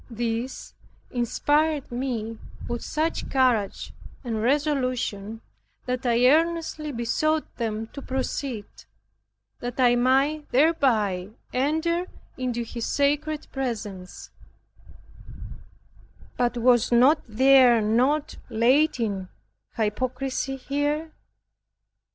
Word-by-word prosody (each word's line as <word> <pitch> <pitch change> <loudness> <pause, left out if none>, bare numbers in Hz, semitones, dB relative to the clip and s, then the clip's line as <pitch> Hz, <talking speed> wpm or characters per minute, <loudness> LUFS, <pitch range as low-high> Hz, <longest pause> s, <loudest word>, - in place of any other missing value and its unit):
This 235 +2 -4 0.4
inspired 290 +5 0
me 235 -3 -3 0.3
with 240 0 -3
such 315 +2 -2
courage 245 -7 +1 0.3
and 225 -4 -2
resolution, 255 -6 -1 0.4
that 250 0 -2
I 240 +1 +3
earnestly 320 0 +1
besought 300 +6 -1
them 225 -2 -2
to 280 - -7
proceed, 260 -4 -3 0.9
that 245 +1 -6
I 245 -1 +5
might 270 +5 +2
thereby 235 - +2 0.2
enter 320 +7 0 0.3
into 245 -2 -2
His 230 0 -5
sacred 295 +2 0
presence, 210 -8 -5 2.0
but 245 0 0
was 240 -1 +4 0.4
there 255 +1 +6
not 250 +8 +1
latent 230 - +1 0.5
hypocrisy 255 +5 -2
here? 290 +4 -2
255 Hz, 85 wpm, -25 LUFS, 230-290 Hz, 2.0 s, there